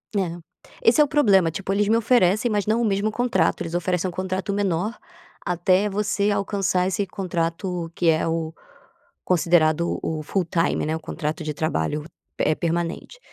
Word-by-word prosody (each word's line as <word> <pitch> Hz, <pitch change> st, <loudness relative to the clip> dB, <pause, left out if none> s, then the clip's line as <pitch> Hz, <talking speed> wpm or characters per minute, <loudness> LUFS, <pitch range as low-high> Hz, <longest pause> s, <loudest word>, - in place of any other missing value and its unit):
É, 175 Hz, -3 st, -1 dB, 0.5 s
esse 245 Hz, +6 st, +5 dB
é -, -, +8 dB
o -, -, 0 dB
problema, 200 Hz, -, +4 dB
tipo, 195 Hz, +4 st, -3 dB
eles 205 Hz, 0 st, +1 dB
me 225 Hz, +1 st, +4 dB
oferecem 220 Hz, -1 st, +3 dB
mas 205 Hz, -1 st, 0 dB
não 225 Hz, +2 st, +2 dB
o -, -, +1 dB
mesmo 205 Hz, +1 st, 0 dB
contrato, 215 Hz, -8 st, +1 dB
eles 165 Hz, 0 st, -4 dB
oferecem 180 Hz, +1 st, 0 dB
um -, -, -6 dB
contrato 190 Hz, +2 st, -3 dB
menor 200 Hz, +2 st, -1 dB, 0.5 s
até 185 Hz, +3 st, +2 dB
você 205 Hz, 0 st, 0 dB
alcançar 195 Hz, -2 st, 0 dB
esse 195 Hz, +2 st, -1 dB
contrato 175 Hz, -1 st, -3 dB
que 170 Hz, -2 st, +2 dB
é 160 Hz, +1 st, +2 dB
o 165 Hz, -1 st, -2 dB, 0.7 s
considerado 170 Hz, -2 st, +2 dB
o 155 Hz, -1 st, -2 dB
full 185 Hz, +3 st, -1 dB
time, 165 Hz, -1 st, 0 dB
né, 155 Hz, +1 st, -1 dB
o -, -, -4 dB
contrato 155 Hz, +1 st, -4 dB
de 150 Hz, -1 st, -3 dB
trabalho, 150 Hz, -, -2 dB, 0.3 s
eh, 155 Hz, -, +3 dB
permanente. 170 Hz, -, -3 dB
185 Hz, 170 wpm, -23 LUFS, 165-205 Hz, 0.7 s, é